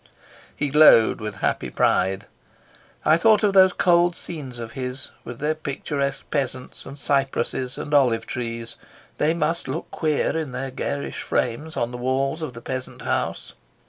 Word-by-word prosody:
He 145 Hz, -, -1 dB
glowed 135 Hz, -7 st, +6 dB
with 105 Hz, -1 st, -4 dB
happy -, -, -1 dB
pride. 95 Hz, +1 st, +1 dB, 0.8 s
I 155 Hz, -, +6 dB
thought 215 Hz, +3 st, +4 dB
of 205 Hz, -2 st, +3 dB
those 190 Hz, -1 st, +7 dB
cold 175 Hz, -1 st, +3 dB
scenes 140 Hz, -7 st, -5 dB
of 115 Hz, -1 st, -6 dB
his, 130 Hz, +1 st, -4 dB
with 120 Hz, 0 st, -8 dB
their 150 Hz, +4 st, 0 dB
picturesque 140 Hz, -2 st, -3 dB
peasants 130 Hz, -3 st, -3 dB
and 140 Hz, -, -9 dB
cypresses 135 Hz, -2 st, -1 dB
and 150 Hz, -, -5 dB
olive 120 Hz, -6 st, +3 dB
trees. 115 Hz, -2 st, -4 dB, 0.4 s
They 155 Hz, +3 st, +2 dB
must 165 Hz, +1 st, -1 dB
look 150 Hz, +6 st, -4 dB
queer 155 Hz, -1 st, 0 dB
in 155 Hz, -5 st, -3 dB
their 135 Hz, +1 st, -4 dB
garish 140 Hz, +2 st, -3 dB
frames 150 Hz, +7 st, -2 dB
on 120 Hz, 0 st, -1 dB
the 125 Hz, -, -6 dB
walls 135 Hz, +4 st, 0 dB
of 155 Hz, -5 st, -4 dB
the 120 Hz, -, -10 dB
peasant 130 Hz, -1 st, -5 dB
house. -, -, -2 dB
135 Hz, 160 wpm, -23 LUFS, 125-155 Hz, 0.8 s, those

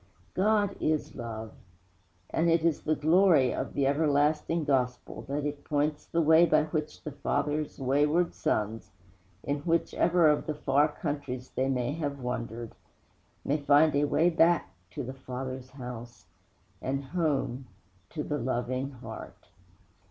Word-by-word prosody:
God 205 Hz, 0 st, +2 dB
is 155 Hz, -1 st, 0 dB
Love; 110 Hz, -2 st, -6 dB, 0.8 s
and 170 Hz, +1 st, +2 dB
it 165 Hz, -1 st, +3 dB
is 165 Hz, -3 st, +1 dB
the 155 Hz, -, +1 dB
glory 160 Hz, -4 st, +4 dB
of -, -, -4 dB
the 140 Hz, -, +2 dB
everlasting 150 Hz, +3 st, +2 dB
Gospel 125 Hz, -4 st, -1 dB
that 145 Hz, +1 st, -2 dB
it 145 Hz, -1 st, -4 dB
points 150 Hz, 0 st, -1 dB
the 170 Hz, 0 st, +1 dB
road 160 Hz, +2 st, +6 dB
by -, -, +4 dB
which 155 Hz, 0 st, -4 dB
the 150 Hz, -, -5 dB
Father's 150 Hz, +2 st, -2 dB
wayward 150 Hz, +6 st, +2 dB
sons 110 Hz, -7 st, -2 dB, 0.5 s
in 145 Hz, +1 st, -1 dB
whichever 170 Hz, +1 st, +2 dB
of 150 Hz, -1 st, +2 dB
the 155 Hz, -, -2 dB
far 145 Hz, 0 st, +3 dB
countries 145 Hz, -5 st, -5 dB
they 130 Hz, +1 st, 0 dB
may 125 Hz, -1 st, 0 dB
have 145 Hz, -2 st, -3 dB
wandered 120 Hz, -2 st, -4 dB, 0.7 s
may 145 Hz, -, +1 dB
find 145 Hz, +1 st, +4 dB
a 145 Hz, +1 st, +3 dB
way 165 Hz, +4 st, +3 dB
back 165 Hz, -, +3 dB, 0.2 s
to -, -, -5 dB
the 130 Hz, +2 st, -6 dB
Father's 130 Hz, 0 st, -6 dB
house, 120 Hz, -5 st, -9 dB, 0.6 s
and 135 Hz, +1 st, -2 dB
home 135 Hz, -5 st, -1 dB, 0.4 s
to 150 Hz, -, -4 dB
the 145 Hz, 0 st, -2 dB
Loving 130 Hz, +2 st, -2 dB
Heart. 130 Hz, -4 st, -10 dB
145 Hz, 145 wpm, -29 LUFS, 130-155 Hz, 0.8 s, road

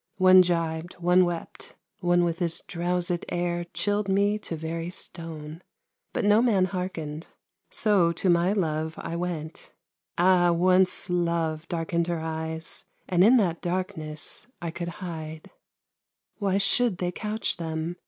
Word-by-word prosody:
One 185 Hz, 0 st, +8 dB
gibed, 165 Hz, -1 st, -1 dB
one 180 Hz, +1 st, +4 dB
wept, 175 Hz, -1 st, -6 dB, 0.2 s
one 175 Hz, -2 st, +3 dB
with 170 Hz, 0 st, -1 dB
his 170 Hz, -2 st, 0 dB
drowséd 175 Hz, 0 st, -1 dB
air 175 Hz, 0 st, -1 dB
Chilled 205 Hz, +3 st, 0 dB
me 200 Hz, +2 st, +2 dB
to 170 Hz, -, -5 dB
very 165 Hz, +2 st, -4 dB
stone, 165 Hz, -2 st, -6 dB, 0.5 s
but -, -, -1 dB
no 210 Hz, +2 st, +5 dB
man 210 Hz, -7 st, +3 dB
hearkened; 175 Hz, -4 st, -5 dB, 0.4 s
So 195 Hz, -6 st, +3 dB
to 180 Hz, -, -2 dB
my 175 Hz, +1 st, +4 dB
love 160 Hz, -5 st, -1 dB
I 170 Hz, -, -5 dB
went 170 Hz, -2 st, -5 dB, 0.5 s
ah! 175 Hz, 0 st, +5 dB
once 185 Hz, +2 st, +3 dB
love 170 Hz, -3 st, -1 dB
darkened 170 Hz, 0 st, -1 dB
Her 170 Hz, -1 st, -1 dB
eyes, 160 Hz, 0 st, -3 dB, 0.2 s
and 180 Hz, -1 st, +4 dB
in 240 Hz, +6 st, +7 dB
that 175 Hz, -7 st, +1 dB
darkness 160 Hz, -3 st, -2 dB
I 170 Hz, -2 st, -4 dB
could 170 Hz, +1 st, -4 dB, 0.2 s
hide 160 Hz, -2 st, -7 dB, 0.9 s
Why 195 Hz, -2 st, +1 dB
should 205 Hz, +1 st, +2 dB
they 180 Hz, -1 st, -1 dB
couch 215 Hz, +3 st, -2 dB
them? 165 Hz, +1 st, -4 dB
175 Hz, 140 wpm, -26 LUFS, 165-185 Hz, 0.9 s, One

